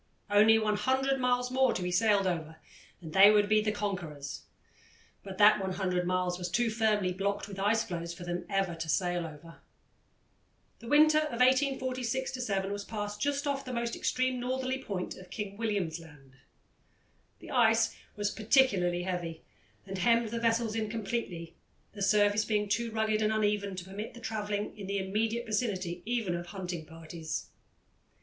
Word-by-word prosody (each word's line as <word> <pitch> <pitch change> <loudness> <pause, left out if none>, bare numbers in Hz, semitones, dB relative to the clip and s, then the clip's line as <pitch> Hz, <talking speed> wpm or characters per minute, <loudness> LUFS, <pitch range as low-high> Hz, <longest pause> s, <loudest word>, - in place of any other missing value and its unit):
Only 215 +2 +6
100 260 +6 +1
miles 250 0 +1
more 260 -1 +3
to 180 - -2
be 180 - -2
sailed 200 +1 +3
over 160 -3 -2 0.5
and 160 -1 -8
they 195 +3 +9
would 210 -1 +4
be 215 0 +4
the 215 0 0
conquerors 175 -9 -5 0.8
but 195 -1 -9
that 210 +1 +7
100 185 -2 -1
miles 180 0 0
was 180 0 -3
too 230 +5 +1
firmly 215 -4 +1
blocked 200 +1 -2
with 195 -2 -8
ice 215 +3 +2
floes 170 -5 -5
for 175 +1 -9
them 175 0 -3
ever 195 -3 0
to 165 -1 -5
sail 175 0 0
over. 160 +2 -12 1.2
The 235 - -11
winter 305 +3 +6
of 300 -6 -3
1846 260 -1 +1
7 195 -3 -1
was 205 0 -4
passed 210 -1 -5
just 285 0 0
off 280 -1 -1
the 255 - -6
most 235 -1 -2
extreme 255 0 0
northerly 260 +1 -2
point 190 -6 -4
of 185 -1 -13
King 205 -2 -5
William's 200 -7 -2
Land. 140 -5 -16 1.0
The - - -11
ice - - +3 0.2
was 205 0 -1
particularly 200 -7 +2
heavy, 175 -3 -4 0.4
and 195 -1 -5
hemmed 230 +3 +3
the 230 +1 -3
vessels 230 -1 +1
in 220 -1 -2
completely, 200 -7 -4 0.4
the 205 - -9
surface 205 +1 +3
being 210 -1 0
too 230 +3 0
rugged 220 -1 0
and 215 0 +2
uneven 205 -2 0
to 180 -1 -6
permit 205 +5 -7
of 235 - -12
travelling 210 -3 -3
in 200 -3 -8
the 200 +1 -1
immediate 220 +5 -1
vicinity 195 -6 -2
even 230 -7 0
of 175 0 -4
hunting 175 -4 -6
parties. 165 0 -6
205 Hz, 170 wpm, -30 LUFS, 180-230 Hz, 1.2 s, they